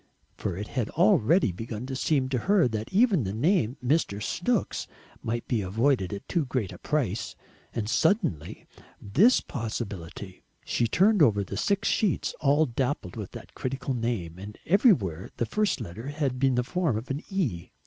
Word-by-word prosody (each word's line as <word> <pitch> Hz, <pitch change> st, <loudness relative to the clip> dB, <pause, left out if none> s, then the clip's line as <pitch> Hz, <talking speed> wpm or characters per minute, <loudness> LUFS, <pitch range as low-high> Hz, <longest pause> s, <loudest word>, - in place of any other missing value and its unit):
For 90 Hz, -, -3 dB
it 105 Hz, +2 st, -5 dB
had 120 Hz, -6 st, -2 dB
already 110 Hz, -, +4 dB
begun 115 Hz, +5 st, -6 dB
to 135 Hz, 0 st, -5 dB
seem 135 Hz, 0 st, +1 dB
to 130 Hz, -2 st, 0 dB
her 200 Hz, -8 st, +5 dB
that 110 Hz, -1 st, -4 dB
even 200 Hz, -, +4 dB
the 95 Hz, -, -3 dB
name 125 Hz, -, +2 dB
of -, -, -4 dB
Mrs. 120 Hz, -9 st, +1 dB
Snooks 205 Hz, -, -1 dB, 0.3 s
might 115 Hz, +1 st, -3 dB
be 115 Hz, -4 st, 0 dB
avoided 105 Hz, +1 st, +1 dB
at 100 Hz, -1 st, -6 dB
too 170 Hz, -, +1 dB
great 125 Hz, -7 st, -2 dB
a 90 Hz, -, -10 dB
price, 115 Hz, -8 st, -1 dB, 0.4 s
and 110 Hz, -3 st, -3 dB
suddenly 160 Hz, -, 0 dB, 0.3 s
this 190 Hz, -, +4 dB
possibility! 100 Hz, -, -6 dB, 0.2 s
She 120 Hz, -, +1 dB
turned 195 Hz, -, +4 dB
over 105 Hz, -8 st, +4 dB
the 100 Hz, -, -6 dB
six 200 Hz, -, 0 dB
sheets, 210 Hz, -6 st, +1 dB
all 145 Hz, +2 st, +4 dB
dappled 125 Hz, -, -2 dB
with -, -, -5 dB
that -, -, -10 dB
critical 135 Hz, +1 st, -3 dB
name, 115 Hz, -9 st, -3 dB
and 105 Hz, +2 st, -9 dB
everywhere 155 Hz, -, +3 dB
the 120 Hz, -, 0 dB
first 205 Hz, -, 0 dB
letter 110 Hz, +3 st, -7 dB
had 140 Hz, -3 st, -2 dB
the 130 Hz, -2 st, +2 dB
form 165 Hz, -3 st, 0 dB
of 120 Hz, +5 st, -5 dB
an 140 Hz, +3 st, -2 dB
E! 130 Hz, -, -2 dB
125 Hz, 170 wpm, -27 LUFS, 105-155 Hz, 0.4 s, her